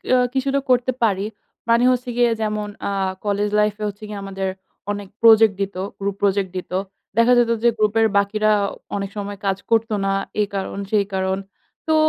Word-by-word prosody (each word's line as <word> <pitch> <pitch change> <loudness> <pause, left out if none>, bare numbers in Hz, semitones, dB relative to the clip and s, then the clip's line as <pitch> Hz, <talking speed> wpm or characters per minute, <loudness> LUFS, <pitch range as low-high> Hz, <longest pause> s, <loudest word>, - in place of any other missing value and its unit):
আ - - +5 0.2
কিছুটা 275 +1 +1
করতে 250 0 +3
পারি। 200 -2 +2 0.4
মানে 235 +1 +4
হচ্ছে 250 0 -1
গিয়ে, 240 -1 +4
যেমন 215 -1 -1 0.2
আ - - -2 0.3
কলেজ 205 0 0
লাইফে 210 0 +1
হচ্ছে 205 +1 -7
গিয়ে, 210 -1 -6
আমাদের 195 -1 -3 0.4
অনেক 205 -1 -5
প্রজেক্ট 225 -2 +7
দিত। 195 0 -2 0.2
গ্রুপ 200 0 -2
প্রজেক্ট 195 -1 +1
দিত। 180 - -6 0.5
দেখা 235 +2 +5
যেত 235 -1 +3
যে, 240 - +6
গ্রুপের 215 +1 +3
বাকিরা 215 +2 +2 0.4
অনেক 195 -1 -3
সময় 205 0 -4
কাজ 195 -1 +1
করতো 225 -1 +2
না। 195 - +1 0.3
এই 205 - +1
কারণ 195 0 -3
সেই 205 -2 +3
কারণ। 190 0 0 0.5
তো 315 - +3
210 Hz, 175 wpm, -21 LUFS, 200-225 Hz, 0.5 s, প্রজেক্ট